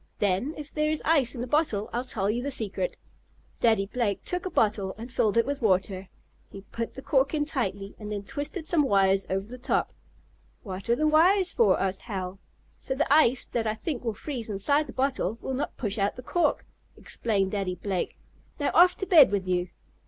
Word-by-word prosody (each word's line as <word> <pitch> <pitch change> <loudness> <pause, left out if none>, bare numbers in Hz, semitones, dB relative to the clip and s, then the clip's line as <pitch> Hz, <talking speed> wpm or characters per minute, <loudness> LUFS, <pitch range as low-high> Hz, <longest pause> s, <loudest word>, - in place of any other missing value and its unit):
Then, 205 +9 0
if 300 -1 -9
there 305 0 +1
is 310 -1 -1
ice 285 -6 +3
in 235 - -5
the - - -2
bottle, 250 -7 +1
I'll 240 +1 -1
tell 205 -6 -2
you 225 +4 0
the 280 - -3
secret." 255 - -3 0.6
Daddy 220 -4 +3
Blake 210 -2 -2
took 360 +1 -3
a - - -3
bottle, 205 - +1
and 235 +3 -8
filled 215 0 +1
it 230 - +4
with 285 0 -3
water. 190 -2 0 0.4
He 195 - -10
put 230 +3 -6
the 265 - -8
cork 275 +2 +2
in 295 -1 0
tightly, 200 -9 -3
and 210 -1 -7
then 205 -1 -3
twisted 290 - -5
some 340 -2 +2
wires 195 -6 +3
over 195 +1 -1
the 250 +4 -10
top. - - 0 0.7
"What 195 +1 -7
are 235 - +4
the 310 - 0
wires 355 +5 +4
for?" 465 - +3
asked 190 0 -1
Hal. 190 -3 -5 0.4
"So 265 - -3
the 285 0 +2
ice, 265 -5 +4
that 225 -2 -2
I 215 - 0
think 255 +3 -4
will 225 -3 -2
freeze 245 -2 -5
inside 285 +10 +1
the - - -7
bottle, 260 -6 -1
will 265 - -4
not 265 +3 -3
push 210 -3 -3
out 200 +1 0
the 250 - -9
cork," 350 +6 0 0.3
explained 195 -4 -1
Daddy 195 -3 -2
Blake. 190 -2 -3 0.4
"Now 285 - 0
off 360 +2 +6
to 385 - -3
bed 320 - +7
with 195 -2 -2
you!" 180 -1 0
235 Hz, 210 wpm, -27 LUFS, 200-290 Hz, 0.7 s, bed